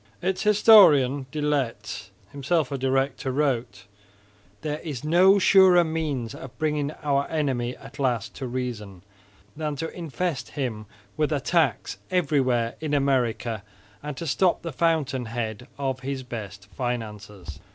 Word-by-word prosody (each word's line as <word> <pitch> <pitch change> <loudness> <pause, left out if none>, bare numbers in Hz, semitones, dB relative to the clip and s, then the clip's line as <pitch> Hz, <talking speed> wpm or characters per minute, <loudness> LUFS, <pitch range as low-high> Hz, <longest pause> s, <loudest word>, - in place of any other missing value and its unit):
Its 185 +1 -1
historian 160 - +6
De 155 - -4
Laet 145 -5 -2 0.2
(himself 145 +1 0
a 140 - -2
director) 135 0 0
wrote, 125 -8 -1 0.8
"There 150 -1 -3
is 150 -6 -6
no 180 +6 +5
surer 190 -2 +6
means 155 -8 -3
of 130 - -10
bringing 150 -2 0
our 140 -1 +1
Enemy 130 -6 -1
at - - -13
last 125 -6 -1
to 130 - -4
reason, 115 -7 -5 0.5
than 150 -1 -3
to 160 +3 -5
infest 165 -4 -3
him 110 -6 -3 0.3
with 155 0 +1
attacks 145 - 0
everywhere 130 -9 +1
in 150 -2 -1
America 125 -5 0 0.4
and 150 -2 -6
to 170 - -5
stop 170 +5 +1
the 165 - -5
fountain 145 -7 0
head 115 +1 -4
of 135 -2 -2
his 135 0 -4
best 105 -5 -8
finances." 105 - -5
135 Hz, 135 wpm, -25 LUFS, 120-155 Hz, 0.8 s, historian